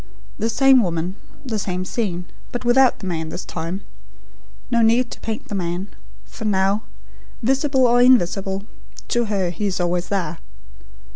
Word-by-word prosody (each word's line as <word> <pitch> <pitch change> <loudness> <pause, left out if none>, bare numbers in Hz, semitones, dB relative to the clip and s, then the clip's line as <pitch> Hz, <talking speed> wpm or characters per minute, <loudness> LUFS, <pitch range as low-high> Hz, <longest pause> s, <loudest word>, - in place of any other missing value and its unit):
"The 225 +2 0
same 265 +2 +6
woman; 175 -2 -1 0.3
the 225 -5 -2
same 185 -2 -2
scene; 185 -4 -2 0.3
but 245 0 -4
without 250 +1 +5
the - - -8
man, 160 -3 -2
this 180 - -6
time. 170 +4 -4 0.9
No 235 -1 +3
need 235 +2 +3
to - - -8
paint 220 -1 -5
the - - -6
man; 180 +1 -2 0.4
for 225 - -10
now 195 0 +2 0.6
visible 270 +1 +3
or 245 0 +5
invisible 195 -5 +3 0.4
to 240 -1 +2
her, 195 -5 0
he 200 +4 -2
is 190 -2 -1
always 175 0 0
there. 170 -5 -2
200 Hz, 155 wpm, -21 LUFS, 180-240 Hz, 0.9 s, same